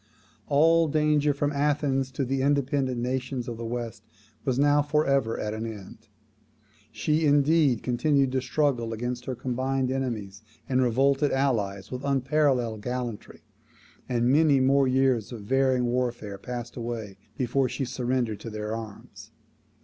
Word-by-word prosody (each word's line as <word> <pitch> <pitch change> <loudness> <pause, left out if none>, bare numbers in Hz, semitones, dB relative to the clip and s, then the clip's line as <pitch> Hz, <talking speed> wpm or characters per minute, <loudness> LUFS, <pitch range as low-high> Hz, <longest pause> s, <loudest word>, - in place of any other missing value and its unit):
All 165 +3 +4
danger 150 -1 +2
from 145 +1 -1
Athens 140 -2 0
to 135 - -1
the 135 +1 -1
independent 135 -2 +1
nations 125 0 -3
of 120 -2 -5
the 115 - -6
West 120 0 -5 0.4
was 130 -2 0
now 145 +1 +4
for 150 +1 +1
ever 135 -5 +1
at 105 0 -3
an 110 +1 -4
end. 110 0 -10 0.8
She, 150 +9 +1
indeed, 145 -3 +3
continued 135 +2 +2
to 130 0 0
struggle 125 -4 0
against 120 +2 -4
her 130 - -3
combined 130 +1 -1
enemies 110 -7 -3 0.3
and 130 -1 +2
revolted 135 +4 +2
allies 105 -8 -1
with 125 +1 -5
unparalleled 135 -5 +1
gallantry; 125 -1 -5 0.7
and 120 0 +2
many 145 -1 +4
more 135 +1 +3
years 130 -3 +1
of 115 -3 -7
varying 130 +3 +2
warfare 120 -5 -2
passed 120 +1 -6
away 115 -4 -5 0.2
before 130 +1 +1
she 135 - -3
surrendered 120 -3 -2
to 115 - -7
their 105 0 -4
arms. 110 -3 -10
130 Hz, 145 wpm, -26 LUFS, 120-140 Hz, 0.8 s, All